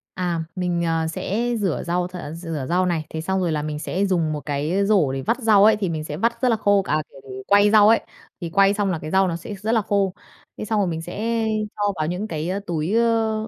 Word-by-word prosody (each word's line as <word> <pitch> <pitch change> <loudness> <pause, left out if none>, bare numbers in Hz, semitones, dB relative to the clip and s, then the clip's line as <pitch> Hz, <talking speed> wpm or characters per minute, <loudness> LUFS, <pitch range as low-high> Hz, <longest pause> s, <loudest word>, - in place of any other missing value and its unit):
À, 175 -3 -1
mình, 175 -2 -1
ờ, 165 -1 0
sẽ 225 +8 -2
rửa 190 -6 -1
rau 175 +1 0
th 180 - -13 0.2
rửa 165 -5 -5
rau 180 +1 +2
này, 165 -3 -1
thế 160 - -5
xong 190 +3 -1
rồi 170 -3 0
là 150 - -1
mình 150 0 -4
sẽ 190 +4 -1
dùng 165 -5 0
một 150 - -4
cái 155 +7 0
rổ 195 -10 +3
để 135 - -3
vắt 235 - -1
rau 215 -4 +5
ấy 220 - +6
thì 195 -4 -2
mình 155 -2 -3
sẽ 150 0 -6
vắt 235 +3 -1
rất 255 - +3
là 230 - +3
khô, 205 -1 +3
à, 155 0 0
kiểu, 130 -1 -10
quay 205 +1 +5
rau 215 -1 +7
ấy, 225 - +5 0.4
thì 170 - -4
quay 195 +2 +4
xong 200 -2 0
là 165 - -2
cái 155 - -7
rau 190 0 +3
nó 170 - -2
sẽ 175 +5 -7
rất 215 +4 -3
là 225 -2 +3
khô. 195 -2 0 0.4
Thế - - -5
xong 215 -1 0
rồi 195 - +1
mình 165 -1 -3
sẽ 225 +6 -2 0.3
cho 205 -1 0
vào 155 0 -2
những 185 +5 -3
cái, 160 0 -3
a, 195 +2 -1
túi, 165 +3 -2
ơ, 225 -1 +1
185 Hz, 265 wpm, -22 LUFS, 160-205 Hz, 0.4 s, rau